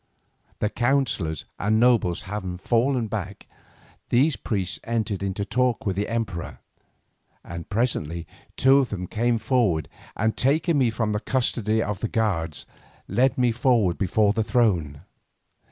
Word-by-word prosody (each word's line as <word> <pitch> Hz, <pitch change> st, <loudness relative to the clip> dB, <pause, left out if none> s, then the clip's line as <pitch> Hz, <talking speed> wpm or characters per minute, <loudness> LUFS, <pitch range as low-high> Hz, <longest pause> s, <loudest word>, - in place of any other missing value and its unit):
The 105 Hz, -, -1 dB
counsellors 120 Hz, -, 0 dB
and 110 Hz, +2 st, +2 dB
nobles 115 Hz, -8 st, +3 dB
having 95 Hz, -2 st, -5 dB
fallen 120 Hz, +5 st, +1 dB
back, 100 Hz, -2 st, -5 dB, 0.6 s
these 135 Hz, +4 st, +3 dB
priests 95 Hz, -5 st, -2 dB
entered 110 Hz, -4 st, -2 dB
into 100 Hz, +1 st, -2 dB
talk 125 Hz, +1 st, 0 dB
with 95 Hz, -3 st, 0 dB
the 100 Hz, +2 st, -1 dB
emperor, 110 Hz, -7 st, -3 dB, 0.9 s
and 85 Hz, -1 st, -8 dB
presently 85 Hz, -8 st, -1 dB, 0.3 s
two 135 Hz, +1 st, +6 dB
of 130 Hz, -4 st, 0 dB
them 90 Hz, -4 st, -4 dB
came 115 Hz, +5 st, 0 dB
forward 110 Hz, -, +1 dB, 0.3 s
and 110 Hz, +2 st, 0 dB
taking 155 Hz, +4 st, +2 dB
me 125 Hz, -3 st, +3 dB
from 110 Hz, -1 st, -1 dB
the 105 Hz, -, 0 dB
custody 110 Hz, -3 st, 0 dB
of 105 Hz, -2 st, -3 dB
the 115 Hz, -, -1 dB
guards, 85 Hz, -, -1 dB, 0.4 s
led 125 Hz, +7 st, +2 dB
me 125 Hz, -2 st, +3 dB
forward 115 Hz, -7 st, +2 dB
before 100 Hz, +2 st, +2 dB
the 110 Hz, -, 0 dB
throne. 90 Hz, -, +1 dB
110 Hz, 140 wpm, -24 LUFS, 95-120 Hz, 0.9 s, two